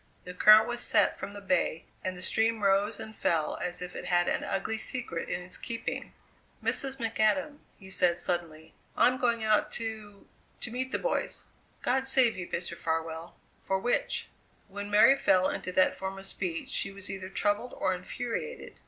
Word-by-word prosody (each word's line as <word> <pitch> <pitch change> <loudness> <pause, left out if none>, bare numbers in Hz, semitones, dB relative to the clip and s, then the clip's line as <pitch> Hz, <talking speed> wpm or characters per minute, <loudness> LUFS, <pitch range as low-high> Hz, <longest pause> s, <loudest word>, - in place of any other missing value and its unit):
The 180 - -8
current 215 +4 +8
was 240 0 -2
set - - +3
from 200 - -7
the 205 - -8
Bay, 180 -4 0 0.2
and 185 -1 -3
the 180 - -8
stream 220 +2 +1
rose 200 +1 +2
and 220 - -8
fell 160 -5 0
as 180 0 -4
if 180 - -8
it - - -6
had 175 -1 +2
an - - 0
ugly 220 +3 -2
secret 225 -10 -3
in 175 - -2
its 180 +1 -5
keeping. 230 -1 -5 0.5
"Mrs. 270 -1 0
McAdam," 235 +5 +1 0.2
he 190 -2 -13
said 175 -2 +3
suddenly, 165 -3 -3 0.2
"I'm 255 +1 +4
going 235 -2 +1
out 215 -1 +2
to 215 -3 -6 0.4
to 235 - -2
meet 260 +2 -3
the - - +1
boys!" - - -1 0.4
"God 265 +1 +1
save 260 -4 +5
ye, 180 -2 -5
Mr. 170 0 -3
Farwell 160 0 -3 0.3
for 190 - 0
which?" 240 +6 -1 0.4
When 205 +1 -6
Mary 210 +6 +7
fell 185 -8 +3
into 185 - -3
that 185 - +4
form 190 0 -5
of 195 - -9
speech 180 -3 -3
she 195 - +1
was 195 -1 -6
either 190 -1 -6
troubled 205 +5 0
or 185 - +1
infuriated. 240 - -5
200 Hz, 180 wpm, -29 LUFS, 180-230 Hz, 0.5 s, current